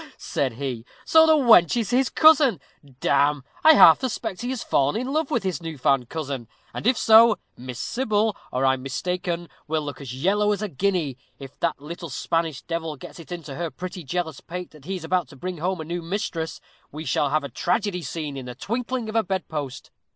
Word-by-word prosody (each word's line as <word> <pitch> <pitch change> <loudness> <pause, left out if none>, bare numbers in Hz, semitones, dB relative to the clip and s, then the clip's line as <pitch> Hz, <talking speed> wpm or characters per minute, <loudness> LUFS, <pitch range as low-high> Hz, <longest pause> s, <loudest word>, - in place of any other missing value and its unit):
said 130 -4 -2
he. 125 -2 -4 0.2
"So 320 0 +6
the 315 - +6
wench 235 - +6
is 230 -1 -1
his 255 +1 +3
cousin. 305 - +5 0.4
Damme, 140 0 +2 0.2
I 315 - +9
half - - +8
suspect 225 -6 -3
he 245 - -3
has 260 -2 -3
fallen 140 +9 +1
in 255 +3 -3
love 310 -2 0
with 235 - 0
his 185 -2 -2
new 165 -2 -6
found 130 -1 +1
cousin; 140 -6 -4 0.3
and - - -3
if 250 -1 +4
so, 225 0 +7 0.2
Miss 125 -1 -8
Sybil, 215 - 0 0.2
or 130 +2 0
I'm 130 -1 +2
mistaken, 175 +5 -3 0.2
will 155 0 -1
look 145 0 -7
as 135 -4 -7
yellow 205 +8 +2
as 205 +1 -4
a - - -1
guinea. 165 -5 -1 0.2
If 135 -1 -12
that 170 - 0
little 170 +3 -8
Spanish 160 +2 -2
devil 165 -2 -3
gets 135 - -11
it 165 - -12
into 165 -5 -6
her 170 +3 -3
pretty 180 +1 -7
jealous 160 +1 -3
pate 180 +1 -7
that 150 -3 -17
he 195 - -3
is 180 - -7
about 175 -1 0
to 135 - -14
bring 180 +5 -5
home 185 +2 -1
a 160 - -5
new 170 +2 -4
mistress, 170 -2 -3 0.3
we 155 +2 -7
shall 140 +2 +1
have 155 +1 +1
a 140 - -5
tragedy 195 - -1
scene 155 -4 -5
in 130 -2 -7
the 125 - -7
twinkling 235 - -3
of 215 - -6
a 225 - +5
bed 190 -3 -3
post. 145 -4 -5
170 Hz, 215 wpm, -24 LUFS, 145-210 Hz, 0.4 s, I